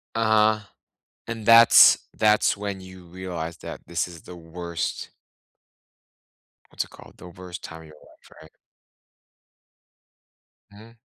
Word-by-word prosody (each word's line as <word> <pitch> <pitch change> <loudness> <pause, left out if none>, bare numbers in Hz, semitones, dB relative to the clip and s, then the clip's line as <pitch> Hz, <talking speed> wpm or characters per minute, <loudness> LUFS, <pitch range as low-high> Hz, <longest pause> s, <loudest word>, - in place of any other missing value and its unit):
Uh-huh. 110 -1 +2 0.7
And 115 -2 -6
that's 115 +1 +7
that's 105 0 +2
when 100 -1 -6
you 95 -1 -14
realize 85 -2 -7
that - - -9
this 85 0 -2
is 85 -2 -13
the 90 - -11
worst 85 0 -6 1.6
what's - - -3
it - - -18
called? - - -17
The 90 - -13
worst 90 0 -11
time 80 0 -10
of 80 - -15
your 75 - -16
life - - -22
right? 80 0 -16 2.2
Mhm. 110 +3 -17
90 Hz, 125 wpm, -24 LUFS, 85-105 Hz, 2.2 s, that's